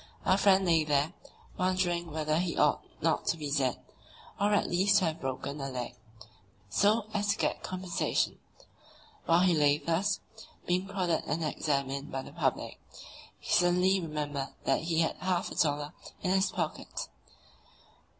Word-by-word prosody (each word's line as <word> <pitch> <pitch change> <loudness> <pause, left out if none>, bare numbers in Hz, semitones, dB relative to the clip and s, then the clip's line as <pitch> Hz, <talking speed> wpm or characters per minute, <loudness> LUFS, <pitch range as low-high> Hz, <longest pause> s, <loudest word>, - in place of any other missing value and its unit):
Our 185 - +4
friend 195 -1 +5
lay 165 -3 +4
there, 150 +2 +1 0.5
wondering 180 -2 0
whether 155 0 0
he 175 -1 -2
ought - - +3 0.2
not - - +1
to 165 - +1
be 150 -2 -4
dead, 135 -4 +1 0.6
or 205 +1 +2
at 205 - +2
least 195 +3 +3
to 190 - +3
have 160 0 -2
broken 135 +2 -4
a 135 - -3
leg, 125 -2 -4 0.8
so 210 - +3
as 205 -1 0
to 205 - +2
get - - -1
compensation. 185 -1 -1 0.9
While 170 +1 +5
he 185 -1 +4
lay 145 -2 +4
thus, 185 +6 0 0.5
being 180 +2 0
prodded 185 -4 -1
and 160 +3 -1
examined 140 -2 -1
by 135 0 -3
the 140 - -11
public, 145 -6 -1 0.6
he - - -7
suddenly 180 +2 +4
remembered 145 -4 -4
that 135 - +2
he 165 0 +1
had 160 - 0
half 185 -1 -1
a - - -7
dollar 145 0 0 0.3
in 180 - +1
his 190 0 +3
pocket. 165 -4 -4
165 Hz, 160 wpm, -30 LUFS, 145-185 Hz, 0.9 s, friend